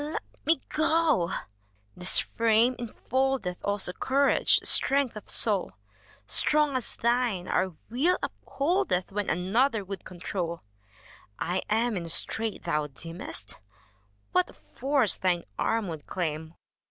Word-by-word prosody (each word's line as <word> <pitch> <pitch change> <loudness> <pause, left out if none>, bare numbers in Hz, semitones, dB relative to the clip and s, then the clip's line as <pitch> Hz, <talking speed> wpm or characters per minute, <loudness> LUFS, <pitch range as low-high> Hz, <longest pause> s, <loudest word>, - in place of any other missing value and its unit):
Let 300 +2 -4 0.2
me 325 +1 +4
go! 310 - +2 0.6
This 180 +1 +4
frame 230 +2 +2
infoldeth 245 -4 -1
Also 200 -3 +1
courage, 275 +6 +3
strength 275 -4 +3
of 210 - -9
soul: 205 -5 0 0.5
Strong 300 - +3
as 255 - -2
thine, 235 -6 0
our 185 -1 0
will 300 +11 +2
upholdeth. 285 - -1
When 205 0 -2
another 210 +5 +1
would 195 0 -6
control. 175 -1 -5 0.7
I 180 +1 -1
am 225 +1 +1
in 170 -3 -4
a - - -7
strait, 220 +6 0
ttiou 150 -3 0
deemestf 165 - -5 0.7
What 180 - +2
a - - -14
force 270 -4 +1
thine 180 -2 +1 0.2
arm 225 -2 0
would 160 -4 -7
claim! 160 -2 -3
215 Hz, 125 wpm, -28 LUFS, 180-265 Hz, 0.7 s, me